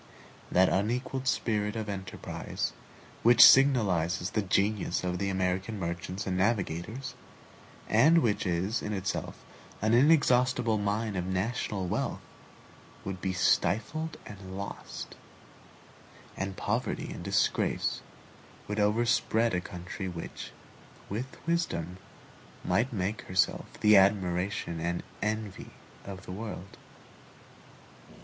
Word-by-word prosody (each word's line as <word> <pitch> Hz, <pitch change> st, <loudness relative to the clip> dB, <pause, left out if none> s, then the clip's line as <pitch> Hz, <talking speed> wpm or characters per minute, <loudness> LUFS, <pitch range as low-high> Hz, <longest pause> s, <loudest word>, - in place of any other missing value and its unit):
That 95 Hz, +1 st, +5 dB
unequaled 125 Hz, +6 st, -1 dB
spirit 105 Hz, -3 st, 0 dB
of 110 Hz, -1 st, -3 dB
enterprise, 95 Hz, -2 st, -4 dB, 0.5 s
which 120 Hz, +1 st, +9 dB
signalizes 95 Hz, -, +4 dB
the 110 Hz, -, +1 dB
genius 100 Hz, +1 st, 0 dB
of 90 Hz, 0 st, -2 dB
the 100 Hz, 0 st, 0 dB
American 95 Hz, +3 st, -1 dB
merchants 90 Hz, +1 st, -4 dB
and 95 Hz, -, -1 dB
navigators, 100 Hz, +5 st, -1 dB, 0.7 s
and 155 Hz, +10 st, +5 dB
which 105 Hz, -3 st, +1 dB
is 90 Hz, +6 st, 0 dB
in 105 Hz, -, -3 dB
itself 95 Hz, -1 st, -3 dB, 0.4 s
an 110 Hz, +2 st, +1 dB
inexhaustible 125 Hz, -4 st, +4 dB
mine 105 Hz, +1 st, -1 dB
of 90 Hz, -1 st, -2 dB
national 95 Hz, 0 st, -1 dB
wealth, -, -, -2 dB, 0.8 s
would 95 Hz, -1 st, -5 dB
be 95 Hz, -, -1 dB
stifled 110 Hz, -, +1 dB
and 95 Hz, -2 st, -9 dB
lost, 100 Hz, 0 st, -7 dB, 1.2 s
and 95 Hz, 0 st, -4 dB
poverty -, -, -2 dB
and -, -, -8 dB
disgrace -, -, 0 dB, 0.7 s
would 105 Hz, +1 st, -2 dB
overspread 115 Hz, +1 st, +2 dB
a 90 Hz, -, 0 dB
country 90 Hz, +2 st, -6 dB
which, 85 Hz, -2 st, -7 dB, 0.6 s
with 120 Hz, +7 st, -5 dB
wisdom, 130 Hz, -, -1 dB, 0.7 s
might 120 Hz, +4 st, +1 dB
make 105 Hz, 0 st, -2 dB
herself 95 Hz, 0 st, -1 dB
the 105 Hz, -1 st, +7 dB
admiration 95 Hz, -2 st, +1 dB
and 85 Hz, +2 st, -2 dB, 0.2 s
envy 110 Hz, -1 st, -3 dB, 0.4 s
of 95 Hz, -1 st, -8 dB
the -, -, -7 dB
world. 100 Hz, -1 st, -7 dB
100 Hz, 110 wpm, -29 LUFS, 95-115 Hz, 1.2 s, which